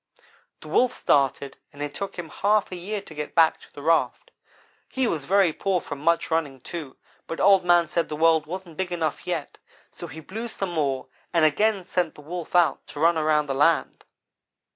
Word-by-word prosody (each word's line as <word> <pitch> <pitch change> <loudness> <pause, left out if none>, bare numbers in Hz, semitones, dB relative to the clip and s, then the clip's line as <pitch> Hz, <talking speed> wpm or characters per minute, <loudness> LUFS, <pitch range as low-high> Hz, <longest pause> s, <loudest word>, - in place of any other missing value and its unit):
"The - - -11
Wolf 250 0 +2
started, 140 0 +1
and 145 - -16
it 145 0 -4
took 200 +4 -5
him 170 -2 -6
half 205 +5 +1
a - - -4
year 200 +3 -4
to 160 - -12
get 150 -1 -6
back 165 -1 +4
to - - -17
the 145 - -11
raft. 165 +1 +1 0.6
He 260 -1 0
was 155 - -2
very 190 -2 +3
poor 190 +2 0
from 145 -3 -7
much 165 +3 +1
running, 150 -5 -1
too, 155 -2 -7 0.3
but 165 - -5
Old 195 -2 +5
man 175 -1 +4
said 170 +1 -1
the 150 - -3
world 160 -1 +3
wasn't 175 -1 -7
big 190 -1 -2
enough 160 -4 -2
yet 165 -5 -4 0.3
so 170 - -8
he 155 +1 -9
blew 220 +9 -6
some 195 -5 -4
more, 140 -5 -1 0.3
and 165 -2 +4
again 195 +5 +2
sent 175 -3 -1
the - - -12
Wolf 170 +3 -6
out 175 -2 +3
to 145 - -9
run 165 +2 +4
around 155 -1 +2
the 140 - -2
land. 150 +4 +1
165 Hz, 205 wpm, -25 LUFS, 150-180 Hz, 0.6 s, Old